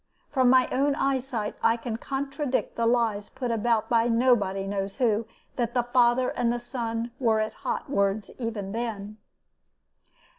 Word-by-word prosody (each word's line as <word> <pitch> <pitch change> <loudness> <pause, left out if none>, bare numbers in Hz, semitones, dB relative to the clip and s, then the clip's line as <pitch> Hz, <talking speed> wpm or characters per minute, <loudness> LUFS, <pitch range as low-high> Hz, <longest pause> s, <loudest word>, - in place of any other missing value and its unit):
From 260 -3 +3
my 255 0 +5
own 280 +2 +2
eyesight 260 -6 -1
I 230 +1 +3
can 230 -1 -4
contradict 275 +1 -2
the 230 0 +1
lies 230 -4 +1
put 255 -2 -3
about 225 -1 +1
by 230 0 +3
nobody 230 -5 +2
knows 195 0 -3
who, 225 -3 +1 0.3
that 240 0 -1
the 245 - +3
father 245 +1 +3
and 235 -1 0
the 240 - -1
son 235 -1 -4
were 225 -4 +2
at 215 0 -1
hot - - -4
words 200 -4 0
even 220 -5 -4
then. 215 -2 -4
235 Hz, 155 wpm, -26 LUFS, 215-250 Hz, 0.3 s, my